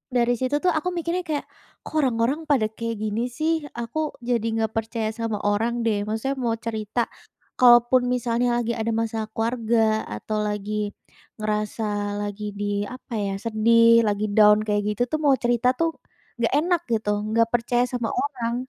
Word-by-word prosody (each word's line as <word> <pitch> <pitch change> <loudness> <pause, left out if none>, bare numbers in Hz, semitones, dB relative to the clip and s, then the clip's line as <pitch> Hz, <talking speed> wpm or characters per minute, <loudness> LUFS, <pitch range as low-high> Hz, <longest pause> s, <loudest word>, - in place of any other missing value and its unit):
dari 240 0 +3
situ 260 +2 0
tuh 360 - +4
aku 350 +3 -1
mikirnya 340 +2 -1
kayak, 300 -2 -2 0.4
"Kok - - -10
orang-orang 255 +2 +1
pada 225 -8 +2
kayak 230 +1 -4
gini 220 +3 -1
sih, 310 +6 -1 0.2
aku 240 +6 -3
jadi 235 -2 0
nggak 220 -1 0
percaya 225 0 -2
sama 225 -1 -3
orang 230 +4 0
deh." 210 -2 0
Maksudnya 225 +6 -2
mau 235 -3 0
cerita 225 0 -3 0.5
kalaupun 245 0 +6
misalnya 245 -1 +1
lagi 235 -1 -1
ada 230 0 -2
masa 225 -1 -2
keluarga 225 -1 +1
atau 105 - -4
lagi 210 0 -3 0.5
ngerasa 215 +1 -2 0.4
lagi 205 0 -4
di, 205 0 -2
apa 255 0 -10
ya, 200 -1 -1
sedih 230 +1 +5
lagi 205 +1 0
down, 210 0 +6
kayak 205 -1 +1
gitu 240 - +1
tuh 310 - 0
mau 280 -2 +5
cerita 245 +1 +1
tuh 330 +2 +1 0.5
nggak 235 +1 +1
enak 345 +2 +1
gitu 220 -2 0 0.2
nggak 230 +1 +3
percaya 240 +1 +2
sama 245 -2 -3
orang. 240 -5 -2
230 Hz, 165 wpm, -24 LUFS, 215-245 Hz, 0.5 s, kalaupun